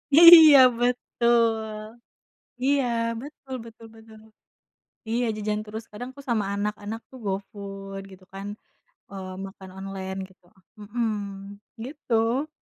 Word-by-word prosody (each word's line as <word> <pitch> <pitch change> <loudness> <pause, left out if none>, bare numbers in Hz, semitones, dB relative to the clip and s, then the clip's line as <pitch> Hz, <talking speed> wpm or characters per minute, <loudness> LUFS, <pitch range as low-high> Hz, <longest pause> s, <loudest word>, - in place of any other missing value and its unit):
Iya 325 -3 +11 0.2
betul 235 -2 +2 1.0
iya 275 -1 +2 0.4
betul 275 -2 -10
betul 225 0 -13
betul. 220 -1 -15 0.9
Iya 240 +2 0
jajan 210 0 -2
terus, 220 +1 -7
kadang 245 +4 -7
aku 280 +1 -13
sama 215 -4 +1
anak-anak 210 +2 -3
tuh 260 - -12
go 195 - 0 0.2
food, 195 -1 -8
gitu 185 0 -15
kan, 195 +1 -7 0.6
eee, 190 -1 -7 0.2
makan 190 -1 -12
online 190 0 -6
gitu. 185 -1 -25 0.4
Mhm, 225 +2 -2 0.8
gitu. 255 -1 -1
220 Hz, 115 wpm, -25 LUFS, 195-245 Hz, 1.0 s, Iya